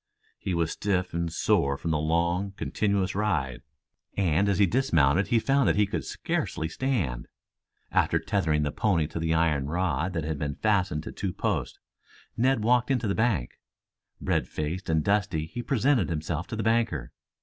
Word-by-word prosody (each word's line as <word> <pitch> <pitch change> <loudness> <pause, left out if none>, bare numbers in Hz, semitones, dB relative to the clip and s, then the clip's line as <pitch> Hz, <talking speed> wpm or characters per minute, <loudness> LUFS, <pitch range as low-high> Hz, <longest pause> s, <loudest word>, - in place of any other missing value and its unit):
He 95 -3 -2
was 85 -1 0
stiff 95 -3 -1
and 85 0 -1
sore 70 -3 +1
from 85 - -3
the 75 - +1
long, 85 +5 0
continuous 100 -1 -1
ride, 85 - -1 0.6
and 95 +1 +2
as 100 - +1
he 100 - +5
dismounted 85 - +2
he 120 - +3
found 135 +4 +2
that - - +2
he 105 0 +4
could 100 - -3
scarcely 80 - -2
stand. 85 - -2 0.6
After - - +2
tethering 80 -7 0
the 75 - -1
pony 95 -6 +1
to 80 +2 -5
the 80 0 +1
iron 75 -4 +1
rod 85 0 -1
that 80 -3 -2
had 80 -1 -3
been 70 -1 -2
fastened 95 -8 +1
to - - -6
two 95 -2 -3
posts, - - -2 0.6
Ned 125 -1 +2
walked 125 +2 +3
into 125 -4 +1
the 100 - +1
bank. 110 - 0 0.6
Red - - 0
faced 80 +5 -4
and 80 -1 +2
dusty 100 -6 +1
he 120 +10 -6
presented 130 0 +2
himself 80 +1 -3
to - - -5
the 110 - -2
banker. 115 - 0
90 Hz, 175 wpm, -27 LUFS, 80-105 Hz, 0.6 s, he